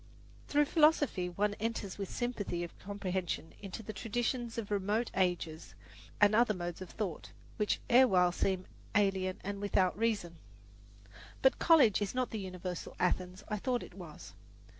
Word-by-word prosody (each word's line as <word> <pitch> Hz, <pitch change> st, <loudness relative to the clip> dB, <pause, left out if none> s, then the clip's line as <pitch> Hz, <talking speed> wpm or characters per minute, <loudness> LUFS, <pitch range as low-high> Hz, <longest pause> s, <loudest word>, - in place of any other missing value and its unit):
Through 295 Hz, 0 st, +3 dB
philosophy 295 Hz, -, +3 dB
one 205 Hz, +4 st, 0 dB
enters 215 Hz, -3 st, -3 dB
with 195 Hz, -, -3 dB
sympathy 205 Hz, -8 st, -2 dB
of 170 Hz, -, -8 dB
comprehension 190 Hz, -4 st, -3 dB
into 200 Hz, +2 st, -7 dB
the 215 Hz, -, -6 dB
traditions 240 Hz, +1 st, -2 dB
of 210 Hz, -3 st, -4 dB
remote 205 Hz, +4 st, 0 dB
ages 175 Hz, -4 st, -1 dB, 0.4 s
and 205 Hz, 0 st, +6 dB
other 220 Hz, -1 st, +4 dB
modes 175 Hz, 0 st, -5 dB
of 185 Hz, -, -7 dB
thought, 195 Hz, -7 st, -4 dB, 0.3 s
which 210 Hz, -1 st, +1 dB
erewhile 195 Hz, -8 st, +5 dB
seemed 185 Hz, +1 st, 0 dB, 0.3 s
alien 190 Hz, -2 st, +2 dB
and 200 Hz, +1 st, -4 dB
without 190 Hz, -2 st, +2 dB
reason. 205 Hz, -6 st, -1 dB, 1.1 s
But 265 Hz, -, +4 dB
college 280 Hz, -, +5 dB
is 205 Hz, +4 st, -2 dB
not 255 Hz, -1 st, 0 dB
the 220 Hz, -, -3 dB
universal 185 Hz, -2 st, -6 dB
Athens 180 Hz, +1 st, 0 dB
I 210 Hz, -, -2 dB
thought 245 Hz, +3 st, -1 dB
it -, -, -11 dB
was. 175 Hz, -5 st, -10 dB
200 Hz, 150 wpm, -33 LUFS, 185-230 Hz, 1.1 s, and